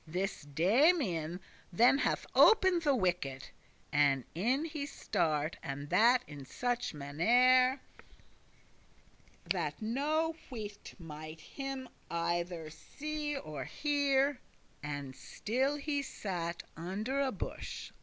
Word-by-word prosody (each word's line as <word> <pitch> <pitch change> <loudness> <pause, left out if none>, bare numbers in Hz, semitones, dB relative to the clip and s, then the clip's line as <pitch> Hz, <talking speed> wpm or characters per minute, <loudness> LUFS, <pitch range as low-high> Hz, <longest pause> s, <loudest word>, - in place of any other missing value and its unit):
This 190 +5 -2
Damian 180 - +2 0.3
then 240 +9 +5
hath - - 0
opened 375 -6 +6
the 290 -4 +3
wicket, 175 - -1 0.4
And 140 -3 +3
in 250 - +1
he 300 -3 -4
start, 155 - -1
and 140 +1 -6
that 245 +3 +5
in 145 -2 -9
such 245 - -2
mannere 250 - +4 1.7
That - - -1
no 300 +8 0
wight 210 -5 -7
might 155 -2 -9
him 270 -2 -6 0.2
either 170 -1 -2
see 300 - -4
or 150 - -6
hear; 285 - +1 0.4
And 145 -3 -5
still 260 - -1
he 290 0 -1
sat 175 -9 -4
under 205 +11 -3
a 270 -1 +1
bush. - - -6
215 Hz, 105 wpm, -33 LUFS, -, 1.7 s, opened